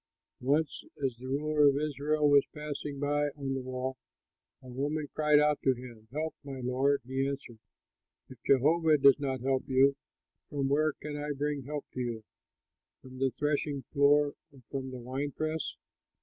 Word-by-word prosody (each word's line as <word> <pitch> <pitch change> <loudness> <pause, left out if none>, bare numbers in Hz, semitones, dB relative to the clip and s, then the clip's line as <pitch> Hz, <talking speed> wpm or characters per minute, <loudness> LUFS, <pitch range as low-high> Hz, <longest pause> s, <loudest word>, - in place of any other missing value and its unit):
Once 145 +5 +1 0.2
as 130 -3 -1
the 130 +2 -9
ruler 150 +2 +3
of 140 - +1
Israel 150 +1 +1
was 145 -1 +7
passing 150 -1 -5
by 145 +1 +1
on 135 -1 -2
the 135 - -2
wall, 130 +1 -4 0.7
a - - -12
woman 145 +4 -2
cried 150 -1 +4
out 150 0 +3
to 130 -1 +3
him, 120 -3 -11
"Help, 155 +2 -2
my 135 -2 -7
lord." 130 +2 +1
He 135 +2 -1
answered, 135 -5 -6 0.7
"If 130 -2 -14
Jehovah 155 +4 +4
does 140 0 +6
not 135 -3 -2
help 130 0 0
you, 135 +1 +5 0.5
from 140 -2 -1
where 155 +2 +2
can 150 +1 -7
I 145 0 -2
bring 145 -1 -2
help 145 0 -4
to - - -5
you? 120 -3 -3 0.8
From 130 0 -11
the 135 0 +3
threshing 145 +1 -1
floor 145 0 +4 0.2
or 135 -3 -18
from 135 -1 -3
the 130 - -7
wine 130 +4 -4
press?" 155 0 -2
140 Hz, 170 wpm, -30 LUFS, 130-150 Hz, 0.8 s, was